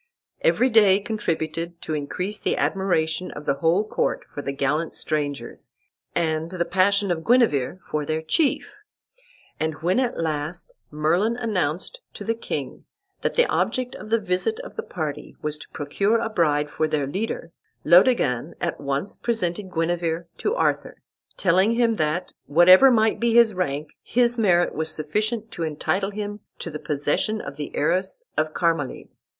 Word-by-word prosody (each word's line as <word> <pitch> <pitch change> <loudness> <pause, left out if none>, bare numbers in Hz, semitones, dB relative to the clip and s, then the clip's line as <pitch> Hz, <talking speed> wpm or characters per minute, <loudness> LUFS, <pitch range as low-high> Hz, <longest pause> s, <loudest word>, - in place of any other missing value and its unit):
Every - - +3
day 205 -4 +6
contributed 170 -5 -3
to 155 - -3
increase 180 +8 -3
the - - 0
admiration 180 -3 0
of 150 - -9
the - - +2
whole 175 +6 +3
court - - -1
for 145 - -4
the 140 - -3
gallant 145 +4 -1
strangers, 145 -6 -3 0.5
and 160 0 0
the 175 -1 -2
passion 195 +2 +2
of 160 -2 -2
Guenever 190 - +3
for 150 -1 -1
their 155 +2 -2
chief; 285 - 0 0.8
and 160 0 -1
when 180 +8 +2
at 250 -2 -1
last 160 - -3 0.2
Merlin 170 +10 +1
announced 205 - -1
to - - -7
the 230 - 0
king 230 - -5 0.4
that - - -1
the 485 - +5
object 255 - -1
of 215 - -9
the 230 +1 +3
visit 205 - -1
of - - -10
the 455 - -2
party 155 - -5
was 150 0 -3
to - - -12
procure 200 +10 0
a 225 - -2
bride 150 -7 +1
for 155 - 0
their 150 -2 0
leader, 175 +2 -4 0.3
Laodegan 170 - +4
at 170 -3 -3
once 140 +6 -2
presented 195 -5 -2
Guenever 170 0 -1
to 425 - 0
Arthur, - - 0 0.4
telling 190 +4 +3
him 230 -2 +2
that, 155 +4 -1
whatever 185 - +8
might 220 -3 +3
be 235 -1 +2
his 235 -2 +6
rank, 150 -5 -2
his 240 0 +2
merit 175 -5 +3
was 160 +1 -2
sufficient 215 +8 -2
to 170 - -7
entitle 175 +5 -1
him 205 0 -5 0.2
to 170 - -6
the 150 - -6
possession 150 +10 -1
of - - -7
the 145 -2 -6
heiress 185 - 0
of 155 0 0
Carmalide. 165 -5 -1
175 Hz, 160 wpm, -24 LUFS, 155-215 Hz, 0.8 s, whatever